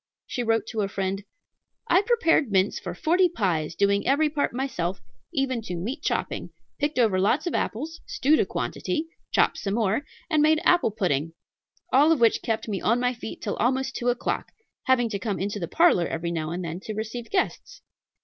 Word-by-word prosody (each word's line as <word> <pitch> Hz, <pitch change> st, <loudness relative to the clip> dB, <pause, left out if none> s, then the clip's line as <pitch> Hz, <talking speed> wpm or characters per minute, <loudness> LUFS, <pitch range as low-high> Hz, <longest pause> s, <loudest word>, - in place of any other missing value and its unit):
She 245 Hz, -, -3 dB
wrote 225 Hz, -1 st, +1 dB
to 220 Hz, -2 st, -2 dB
a 200 Hz, -, 0 dB
friend: 195 Hz, 0 st, -3 dB, 0.6 s
"I 355 Hz, +3 st, +5 dB
prepared 390 Hz, -, +2 dB
mince 190 Hz, +1 st, +2 dB
for 175 Hz, -, -6 dB
forty 355 Hz, -, +3 dB
pies, 175 Hz, -, -1 dB
doing 200 Hz, 0 st, +2 dB
every 295 Hz, +3 st, +3 dB
part 290 Hz, -1 st, 0 dB
myself, 195 Hz, -9 st, -2 dB, 0.3 s
even 260 Hz, -3 st, 0 dB
to 180 Hz, -5 st, -5 dB
meat 235 Hz, -, -4 dB
chopping; -, -, -2 dB, 0.3 s
picked 295 Hz, -1 st, -1 dB
over 220 Hz, -6 st, +3 dB
lots 215 Hz, -, +2 dB
of 345 Hz, -, -2 dB
apples, 310 Hz, +9 st, -3 dB
stewed 300 Hz, +4 st, +2 dB
a -, -, +3 dB
quantity, 325 Hz, -2 st, -2 dB, 0.3 s
chopped -, -, +2 dB
some 200 Hz, 0 st, -2 dB
more, 225 Hz, +3 st, +1 dB, 0.2 s
and 310 Hz, -3 st, +2 dB
made 310 Hz, +1 st, +4 dB
apple 350 Hz, -8 st, +4 dB
pudding; 165 Hz, -7 st, -1 dB, 0.6 s
all 290 Hz, +5 st, +6 dB
of 320 Hz, -, +3 dB
which 230 Hz, -2 st, +4 dB
kept 225 Hz, 0 st, -2 dB
me 200 Hz, -3 st, -2 dB
on 230 Hz, +3 st, +2 dB
my 250 Hz, 0 st, +1 dB
feet 235 Hz, -2 st, -8 dB
till 205 Hz, -, -2 dB
almost 265 Hz, +3 st, 0 dB
two 245 Hz, -, 0 dB
o'clock, 245 Hz, -, -2 dB, 0.3 s
having 250 Hz, -2 st, +3 dB
to 205 Hz, -3 st, -3 dB
come 205 Hz, -2 st, -2 dB
into 205 Hz, +2 st, -2 dB
the 170 Hz, -, -3 dB
parlor 330 Hz, -, +4 dB
every 170 Hz, +1 st, -3 dB
now 155 Hz, -2 st, -2 dB
and 175 Hz, +2 st, -4 dB
then 165 Hz, +2 st, -4 dB
to 215 Hz, +2 st, -6 dB
receive 225 Hz, +2 st, -5 dB
guests." 380 Hz, -, -2 dB
230 Hz, 195 wpm, -25 LUFS, 195-285 Hz, 0.6 s, all